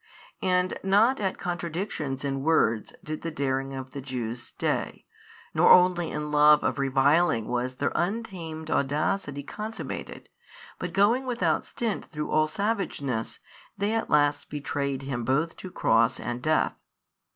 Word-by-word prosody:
And 180 0 +1
not 210 +7 +4
at 195 -2 -1
contradictions 170 -6 -3
in 135 -1 -2
words 115 -8 +2
did 155 0 -5
the 165 - -3
daring 135 -3 -2
of 130 0 -7
the 140 - -6
Jews 125 -3 -4
stay, - - -3 0.5
nor - - +5
only 180 -2 +5
in 150 0 -4
love 150 0 +6
of - - 0
reviling 135 -2 +3
was 125 +1 -2
their 140 +3 -1
untamed 175 -6 -3
audacity 145 +1 0
consummated, 215 +8 -6 0.5
but 180 - -4
going 225 +8 +3
without 245 -1 0
stint 230 -4 -2
through 150 0 -5
all 155 0 +3
savageness, 155 - -2 0.4
they 205 +2 0
at 225 - -1
last 145 -1 +2
betrayed 140 -2 -3
Him 130 -3 -3
both 150 +7 0
to 185 - -8
Cross 115 -7 +2
and 120 +1 -4
Death. 155 +3 +2
150 Hz, 140 wpm, -27 LUFS, 135-180 Hz, 0.5 s, love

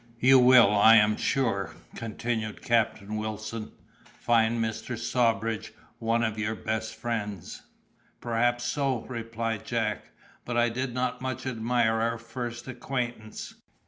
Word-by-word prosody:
"You 130 +2 +7
will, 125 -4 +7
I 105 +2 +7
am 105 -1 +5
sure," 115 -9 0 0.2
continued 110 -1 -4
Captain 110 -3 0
Wilson, 110 +1 -5 0.5
"find 115 0 +3
Mr. 110 +1 -3
Sawbridge 115 -2 0 0.3
one 115 +1 +1
of 110 -1 -1
your 110 +1 -1
best 110 0 -3
friends." 105 -6 -4 0.6
"Perhaps 120 +1 0
so," 135 -3 0
replied 115 -2 -4
Jack; 110 -4 -2 0.4
"but 120 -1 -3
I 120 0 +4
did 125 +1 -3
not 125 0 -1
much 130 0 -4
admire 115 -2 +1
our 115 +1 0
first 120 +1 -6
acquaintance." 120 -3 -4
115 Hz, 125 wpm, -28 LUFS, 110-120 Hz, 0.6 s, You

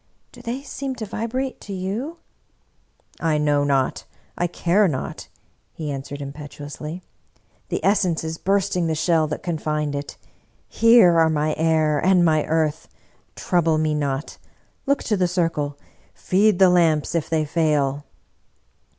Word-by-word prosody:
Do - - -13
they 245 +3 -4
seem 275 -1 -5
to 225 - -5
vibrate 235 +5 -4
to 200 - -7
you? 210 - -4 0.3
" - - -43
" - - -45 0.2
I 160 -2 +1
know 145 -1 +2
not, 135 -2 0 0.3
I 175 - 0
care 180 +4 +2
not," 135 -6 -4 0.5
he 155 -3 -5
answered 140 +1 -6
impetuously. 145 +4 -8 0.3
" - - -39
The - - -2
essence 185 -5 +2
is 160 0 -5
bursting 195 -2 +1
the 160 - 0
shell 160 0 +2
that 150 - -5
confined 150 -3 -2
it. 140 0 -5 0.5
Here 230 -8 +5
are 160 0 +4
my 155 0 0
air 155 -2 +1
and 180 -1 +4
my 155 -2 +2
earth! 160 -1 0 0.5
Trouble 165 -4 +1
me 155 -1 +1
not. 145 -1 -3 0.5
Look 280 +1 +1
to 215 - 0
the 185 -2 +1
circle 165 -5 -1 0.2
— - - -34
feed 200 +1 +2
the 190 -1 +6
lamps 160 -4 +2
if 165 -3 -1
they 155 -1 +1
fail! 145 -3 0
160 Hz, 155 wpm, -22 LUFS, 150-190 Hz, 0.5 s, the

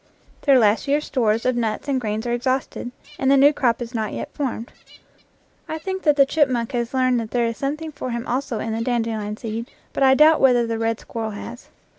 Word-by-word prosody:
Their 275 -2 +5
last 215 -1 +3
year's 290 +2 +1
stores 230 -4 0
of 255 -1 +2
nuts 225 +1 -2
and 270 -2 0
grains 215 0 -3
are 240 - -1
exhausted, 255 0 -2 0.3
and 265 - +1
the 275 - +5
new 285 +2 +6
crop 240 -4 +1
is 235 +1 -10
not 220 -2 -2
yet - - -6
formed. 250 -5 -4 1.0
I 315 - -3
think 380 +4 -4
that 300 -4 +3
the 280 -1 +6
chipmunk 265 -6 +1
has 240 0 -2
learned 255 -1 +2
that 225 -2 -5
there 240 0 +1
is 230 -1 -3
something 305 +3 -3
for 255 - -6
him 235 0 -3
also 255 -2 -2
in 220 +1 -3
the 225 - -2
dandelion 225 -3 -2
seed, 230 +2 -5 0.2
but - - -3
I 265 0 +6
doubt 310 +2 +5
whether 245 -3 +4
the 230 -1 -3
red 225 0 -1
squirrel 225 -1 -5
has. 230 +4 -9
245 Hz, 220 wpm, -22 LUFS, 230-275 Hz, 1.0 s, new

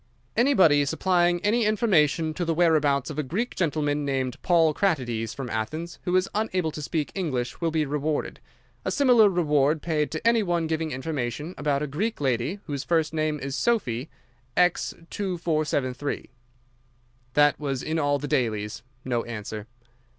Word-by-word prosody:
"'Anybody 190 - +5
supplying 175 +3 +2
any 230 +3 +3
information 170 -8 +2
to 175 - -3
the 165 -1 0
whereabouts 155 -5 +2
of 155 - -5
a - - +3
Greek 190 - -3
gentleman 150 -4 0
named 130 -3 -2
Paul 165 -3 +4
Kratides, 120 - -1
from 135 -2 -5
Athens, 155 +10 -4
who 180 - +1
is 185 0 +3
unable 185 -6 0
to 150 - -7
speak 150 0 -2
English, 140 -10 -3
will 165 - +1
be 155 -1 0
rewarded. 150 +1 -2 0.4
A - - -1
similar 245 -7 +5
reward 150 -4 +2
paid 155 -3 0
to 160 +8 -2
any 230 -1 +4
one 175 -4 0
giving 160 0 -1
information 145 +2 -3
about 145 -1 0
a - - 0
Greek 200 +11 -2
lady 135 - 0
whose 140 -4 -4
first 160 -2 +1
name 155 -1 0
is 135 -1 -4
Sophy. 150 - 0 0.5
X 180 -1 +2 0.2
2473.' 155 -8 -2 1.0
That 145 0 +4
was 135 -3 -2
in 160 +1 -1
all 145 -1 +2
the 145 +1 -5
dailies. 110 -5 -1 0.2
No 120 -2 0
answer." 105 -1 -6
155 Hz, 160 wpm, -26 LUFS, 140-175 Hz, 1.0 s, Anybody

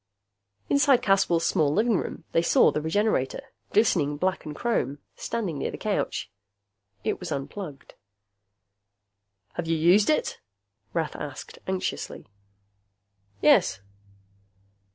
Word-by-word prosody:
Inside 280 -3 +4
Caswell's 185 -4 +3
small 150 -2 +2
living 220 +6 +2
room, - - -3
they 165 - +3
saw 170 - +5
the 150 - -2
Regenerator, 205 - 0 0.2
glistening 160 -9 +2
black 185 +3 -1
and 150 -1 -6
chrome, 225 - -1 0.2
standing 185 -11 -3
near - - -1
the - - -6
couch. - - -2 0.7
It - - -1
was - - -6
unplugged. 140 +1 -6 1.6
"Have 175 - -4
you 165 0 +1
used 180 +6 +5
it?" 305 - +1 0.5
Rath 165 -2 -1
asked 145 -3 -7
anxiously. 190 -1 -3 1.2
"Yes." 95 - +5
175 Hz, 110 wpm, -26 LUFS, 150-210 Hz, 1.6 s, saw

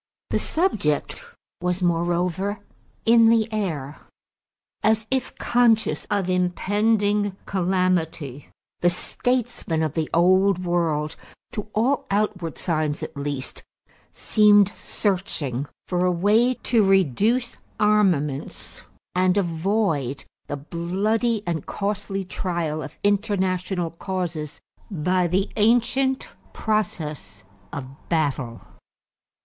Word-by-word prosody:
The - - +2
subject 215 - 0 0.4
was 180 +1 -1
moreover 175 +3 0 0.4
in 230 0 +6
the 225 -1 +4
air. 160 -9 -3 0.8
As 220 +1 +2
if 260 -1 -1
conscious 235 -2 +2
of 200 -3 -1
impending 205 +2 +1
calamity, 175 -7 -1 0.3
the 175 - +4
statesmen 240 -3 -1
of 155 - -1
the 160 -2 -1
Old 185 +2 +3
World, 160 -3 0 0.4
to 210 -3 -5
all 245 +6 +1
outward 200 -4 -1
signs 155 -4 -1
at - - -6
least, 140 -2 -4 0.5
seemed 205 -2 +5
searching 165 - -2 0.2
for 180 -1 0
a 180 - +3
way 215 +8 +3
to 230 -3 +2
reduce 195 - +2 0.2
armaments 185 -10 +1 0.3
and 185 +1 +2
avoid 165 - 0 0.2
the 145 - -3
bloody 200 - -1
and 165 -4 -3
costly 200 -1 -3
trial 170 -4 -2
of 150 - -8
international 190 -4 0
causes 170 -4 -4 0.3
by 180 0 +1
the 190 +4 0
ancient 245 +5 +2 0.2
process 150 - -2 0.3
of 140 -2 -5 0.2
battle. 140 -7 -1
185 Hz, 100 wpm, -24 LUFS, 160-210 Hz, 0.8 s, in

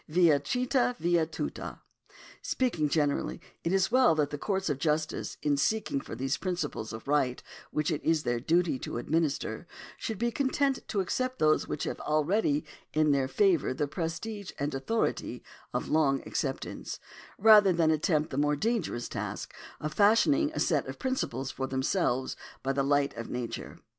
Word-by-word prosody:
Via 160 -3 +5
trita 250 - +1
via 170 -3 +2
tuta. 160 - -5 0.6
Speaking 175 - 0
generally, 145 -2 0 0.2
it 165 - 0
is 190 +2 +2
well 255 -8 +5
that 150 -2 +1
the 145 - -3
courts 195 +1 -1
of 145 -4 -1
justice, 155 0 -1
in 145 -1 +3
seeking 175 -3 0
for - - -7
those 135 +1 -1
principles 165 - -3
of 110 +4 -8
right 140 -4 +1 0.3
which 150 +2 0
it 150 - -2
is 160 -1 +2
their 120 -1 0
duty 165 +1 +1
to - - -5
administer, 155 +4 -1 0.3
should 220 -4 -3
be 235 +3 0
content 275 +1 +1
to 200 - 0
accept 255 +7 -1
those 155 0 +3
which 150 - -3
have - - -3
already 155 0 +1 0.3
in 155 -1 +4
their 135 -2 +2
favour 165 -1 +2
the 145 - 0
prestige 185 +7 -4
and 145 +1 -2
authority 135 +13 -1 0.3
of - - -2
long 140 -4 +2
acceptance, - - -3 0.4
rather 210 -2 +7
than 165 -2 +3
attempt 155 0 +1
the 135 - -3
more 150 0 +2
dangerous 190 - -1
task - - -5 0.3
of 155 0 -4
fashioning 285 +9 +4
a - - -2
set - - +1
of - - -6
principles 135 - -2
for 135 0 -3
themselves 130 -1 0 0.3
by 135 0 0
the 140 - +1
light 140 0 +2
of 115 - -5
nature. 125 -1 -5
155 Hz, 170 wpm, -29 LUFS, 140-200 Hz, 0.6 s, rather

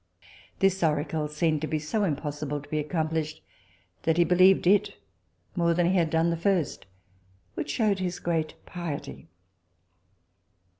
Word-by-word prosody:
This 195 0 +2
oracle 150 0 0
seemed 155 0 0 0.2
so 210 +7 0
impossible 150 -3 -2
to 145 - -15
be 155 - -1
accomplished, 155 0 -2 0.6
that 160 0 +1
he 175 - +6
believed 185 +3 +5
it 200 +2 +3 0.6
more 170 -1 +2
than 175 0 +2
he - - +1
had 170 -3 +2
done 165 +1 +2
the 165 - -1
first, 175 - 0 0.7
which - - -4
shewed 210 -4 +1
his 180 -1 -2
great 165 -2 -1
piety. 155 -5 -6
165 Hz, 135 wpm, -27 LUFS, 155-180 Hz, 0.7 s, he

